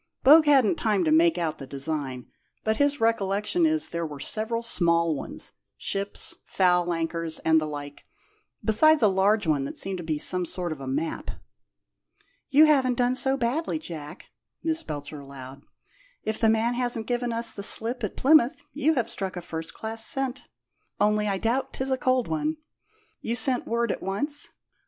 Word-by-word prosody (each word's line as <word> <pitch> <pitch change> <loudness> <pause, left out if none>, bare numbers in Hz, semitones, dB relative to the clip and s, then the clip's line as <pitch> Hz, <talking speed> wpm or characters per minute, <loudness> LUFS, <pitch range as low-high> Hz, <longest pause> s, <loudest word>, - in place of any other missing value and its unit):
Bogue 305 +3 +7
hadn't 270 -8 +4
time 210 -4 +1
to 155 - +1
make 165 +2 +4
out 165 -3 -2
the 135 - -8
design, 140 -2 -3 0.4
but 220 0 0
his 285 0 +1
recollection 225 - +1
is 315 0 +1
there 170 0 -3
were 150 -3 -6
several 225 +7 -2
small 170 -6 +2
ones 140 - -5 0.3
ships, 200 +1 -1
foul 180 -2 +1
anchors, 165 -1 -3
and 160 0 +4
the 155 - -3
like 145 -1 -8 0.6
besides 305 +6 +4
a - - +7
large 200 +2 +2
one 150 -4 +1
that - - -6
seemed 190 -1 -3
to - - -6
be 160 -2 -2
some 180 +4 +3
sort 175 0 -3
of 150 -3 -6
a 135 - -7
map." 150 +5 -3 1.2
"You 295 +2 +6
haven't 265 -5 +2
done 245 0 +2
so 265 +1 +4
badly, 275 +7 -1
Jack," 155 - -9 0.4
Miss 320 0 0
Belcher 145 -1 -7
allowed. 135 -1 -11 0.6
"If 220 - -3
the 225 - +3
man 225 +2 +1
hasn't 240 -2 -2
given 245 0 -2
us 230 0 +2
the 200 - -7
slip 230 +4 +3
at 210 - -4
Plymouth 280 -2 +3
you 310 +2 +1
have 240 -4 0
struck 195 -5 -3
a - - -2
first 165 -1 -7
class 225 0 -3
scent. 270 +1 -1 0.5
Only 210 0 +2
I 195 -1 0
doubt 235 +6 -1
'tis 265 0 -2
a - - +3
cold 255 -1 +1
one. 310 0 -2 0.6
You 230 - -2
sent 245 +2 +2
word 235 -1 0
at - - -5
once?" 285 +11 -1
215 Hz, 180 wpm, -25 LUFS, 165-255 Hz, 1.2 s, Bogue